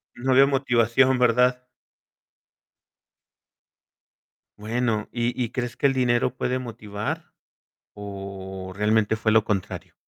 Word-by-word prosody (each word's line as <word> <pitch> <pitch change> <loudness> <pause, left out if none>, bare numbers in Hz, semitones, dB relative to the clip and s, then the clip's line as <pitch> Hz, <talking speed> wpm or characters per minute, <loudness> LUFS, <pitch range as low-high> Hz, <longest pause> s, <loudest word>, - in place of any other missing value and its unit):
No 130 +1 0
veo 135 +1 +7
motivación, 130 -1 +2
¿verdad? 125 +1 +3 3.0
Bueno, 110 0 -1
¿y 120 +1 -2
y 115 - -2
crees 120 -1 -4
que - - +2
el 135 - +3
dinero 125 -1 +1
puede 130 0 -1
motivar, 105 -4 -6 0.6
o 95 -2 -8
realmente 105 +1 +2
fue 110 0 0
lo 110 -2 +4
contrario? 100 -4 -4
115 Hz, 105 wpm, -24 LUFS, 105-125 Hz, 3.0 s, veo